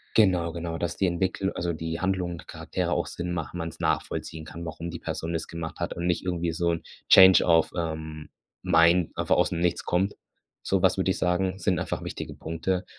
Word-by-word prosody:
Genau, 90 -6 +4
genau, 85 0 -4
dass 85 0 -3
die 95 - +2
Entwicklu 95 +2 0
also, 85 0 -2
die 80 +1 -4
Handlung 95 -2 -1
der - - -13
Charaktere - - -3
auch - - 0
Sinn 90 0 -4
machen, 85 +1 -4
man's 85 -1 -5
nachvollziehen 80 -1 -2
kann, 85 +2 -8
warum 85 +1 -5
die 85 -1 -6
Person 80 +1 -4
das 80 -1 -3
gemacht 85 +1 -6
hat 85 - -2
und 85 +1 -3
nicht 90 - 0
irgendwie 85 -2 -1
so 85 +1 +1
'n 85 - -2 0.3
Change 95 0 +9
of, 85 -2 +4
ähm, 80 -2 -4 0.3
mind 85 +1 +4
einfach - - +2
aus'm 85 - +2
nichts 85 0 0
kommt. 95 +3 +1 0.5
So - - +1
was, - - +3
würde - - +2
ich - - -2
sagen, 95 +2 0
sind 95 -3 +1
einfach - - -3
wichtige - - -6
Punkte. 90 +3 -2
85 Hz, 205 wpm, -27 LUFS, 80-90 Hz, 0.5 s, Change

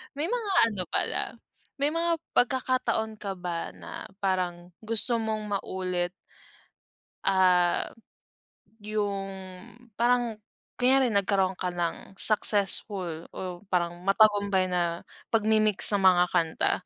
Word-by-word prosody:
May 300 +4 -2
mga 455 -3 -2 0.2
ano 200 -5 -3
pala, - - +1 0.6
may 285 - +2
mga 335 +1 0 0.2
pagkakataon 245 -3 +1
ka 200 -2 -5
ba 175 -2 -5
na - - -9 0.2
parang 180 -3 -2 0.2
gusto 230 +2 +4
mong 220 -2 -2
maulit 180 -2 -3 1.1
ah, 180 -2 +3 0.9
yung 205 -2 -2 0.6
parang 235 -1 +1 0.4
kunyari 255 -1 +4
nagkaroon 195 -1 +2
ka 180 - -1
ng 175 +2 -4
successful 195 -5 +1
o 180 -2 -6
parang 175 -1 -1
matagumpay 200 -1 +3
na 175 -2 -2 0.2
pagmimix 215 -2 +3
ng 200 - +2
mga 180 -2 +5
kanta? 165 -3 +1
200 Hz, 105 wpm, -27 LUFS, 180-220 Hz, 1.1 s, mga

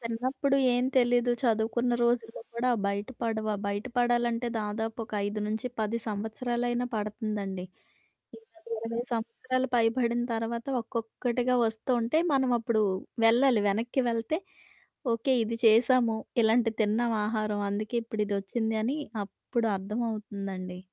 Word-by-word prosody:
చిన్నప్పుడు 260 +4 0 0.2
ఏం 245 +1 +2
తెలీదు. 245 -1 +4
చదువుకున్న 235 +1 +1
రోజుల్లో 235 -2 0
కూడా 250 +2 +1 0.2
బయట 200 +1 -1 0.2
పడవు. 220 -1 -1
ఆ - - -2
బయట 200 +2 -2
పడాలంటే 240 0 +2
దాదాపు 220 +2 -3
ఒక 220 - -19
5-10 220 +2 -2
సంవత్సరాలైనా 240 +3 -1
పడుతుందండి. 210 -3 -3 0.7
ఇంక 450 0 -20 0.3
20 230 +1 -3
సంవత్సరాలు 255 +3 -1
పైబడిన 235 +1 +2
తర్వాత 230 +1 -3
ఒక్కొక్కటిగా 240 +2 -1
వస్తూ 220 +3 -3
ఉంటే, 235 +8 +2
మనం 265 -2 +3
అప్పుడు 225 -1 +1 0.4
వెళ్ళాలి 240 -1 +5
వెనక్కి 230 +6 0
వెళ్తే, 230 +8 -1 0.8
ఓకే 230 +4 +1
ఇది 230 +1 -3
చేశాము, 230 +1 +5 0.3
ఇలాంటిది 225 0 +3
తిన్నాం 225 +3 +1
ఆహారం, 215 -1 -1
అందుకే 215 +3 -2
ఇప్పుడు 220 -2 -2
ఇదోచ్చిందని 220 +5 -1 0.3
అప్పుడు 230 +4 -2
అర్థమవుతుందండి. 200 -3 -4
230 Hz, 115 wpm, -29 LUFS, 215-240 Hz, 0.8 s, వెళ్ళాలి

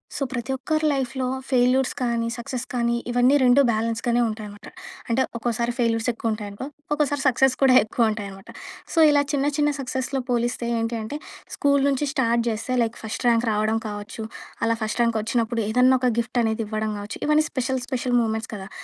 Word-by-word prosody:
So 275 - -1
ప్రతి 255 +1 -3
ఒక్కరి 310 +4 -1
లైఫ్‌లో 265 -1 -2 0.2
ఫెయిల్యూర్స్ 255 +1 +3
కానీ 235 -2 0
సక్సెస్ 245 +1 -5
కానీ 235 -1 +1 0.2
ఇవన్నీ 245 +3 +4
2 255 +2 +6
బ్యాలెన్స్‌గానే 230 +2 0
ఉంటాయనమాట. 210 -1 -7 0.4
అంటే, 235 +3 +2 0.2
ఒక్కోసారి 235 0 -1
ఫెయిల్యూర్స్ 230 -1 +1
ఎక్కువుంటాయనుకో, 215 -1 -4 0.3
ఒక్కోసారి 290 -2 0
సక్సెస్ 265 +1 +3
కూడా 265 -2 +6
ఎక్కువుంటాయనమాట. 210 -3 -2 0.4
సో 330 - +2
ఇలా 290 -1 +4
చిన్న 280 -2 0
చిన్న 295 0 +3
సక్సెస్‌లో 260 +1 -2
పోలిస్తే 240 0 0
ఏంటి 230 +1 -1
అంటే 220 +7 -5 0.4
స్కూల్ 280 -1 +2
నుంచి 280 +1 +1
స్టార్ట్ 235 -4 +2
చేస్తే 230 +3 -2
లైక్ 230 0 -1
ఫస్ట్ 220 +3 -5
ర్యాంక్ 235 0 +3
రావడం 215 +1 +1
కావచ్చు, 210 +1 -6 0.4
అలా 230 0 +2
ఫస్ట్ 215 +2 -3
ర్యాంక్ 230 -1 +2
వచ్చినప్పుడు 230 +1 -1
ఏదన్నా 250 +3 +4
ఒక 250 0 +2
గిఫ్టనేది 230 -1 0
ఇవ్వడం 215 0 -2
కావచ్చు, 205 +1 -7
ఇవన్నీ 305 +1 +4
స్పెషల్, 260 0 -1
స్పెషల్ 250 -1 -1
మూమెంట్స్ 220 0 -2
కదా! 195 -1 -8
235 Hz, 160 wpm, -24 LUFS, 225-260 Hz, 0.4 s, 2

